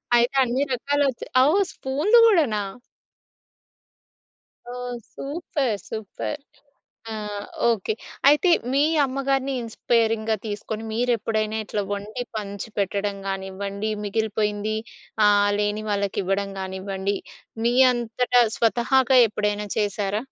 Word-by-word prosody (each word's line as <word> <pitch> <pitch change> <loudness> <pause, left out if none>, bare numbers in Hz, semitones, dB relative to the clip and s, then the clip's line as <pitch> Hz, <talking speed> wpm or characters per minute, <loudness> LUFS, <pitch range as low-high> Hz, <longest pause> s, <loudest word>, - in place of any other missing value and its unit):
అయితే 240 +3 +3
అన్ని 255 +3 0
రకాలొచ్చాయి. 280 0 0
అవు 300 +7 +4 0.2
స్పూనులు 305 - +3
గూడనా? 300 - +3 2.1
ఓహ్! 250 0 -5 0.2
సూపర్. 280 - -2
సూపర్. 220 +7 -5 0.7
ఆ! - - -4 0.5
ఓకే. 220 -2 +1 0.4
అయితే 300 +5 +5 0.2
మీ 280 +1 +3 0.2
అమ్మగారిని 270 0 -1
ఇన్‌స్పైరింగ్‌గా 225 -1 +1
తీసుకొని 215 +1 -4
మీరెప్పుడైనా 220 -2 0
ఇట్లా 205 0 -2
వండి 210 +4 -4
పంచిపెట్టడం 200 -1 -3
గానివ్వండి, 195 +2 -3
మిగిలిపోయింది 210 0 -1 0.5
ఆహ్, 205 0 +4
లేని 210 +1 -1
వాళ్ళకివ్వడం 200 0 -1
గానివ్వండి, 190 +1 -3 0.5
మీ 240 +1 +2 0.2
అంతట 240 +1 -2 0.2
స్వతహాగా 250 +3 +3
ఎప్పుడైనా 210 0 -1
చేశారా? 205 -1 0
220 Hz, 90 wpm, -24 LUFS, 205-250 Hz, 2.1 s, అయితే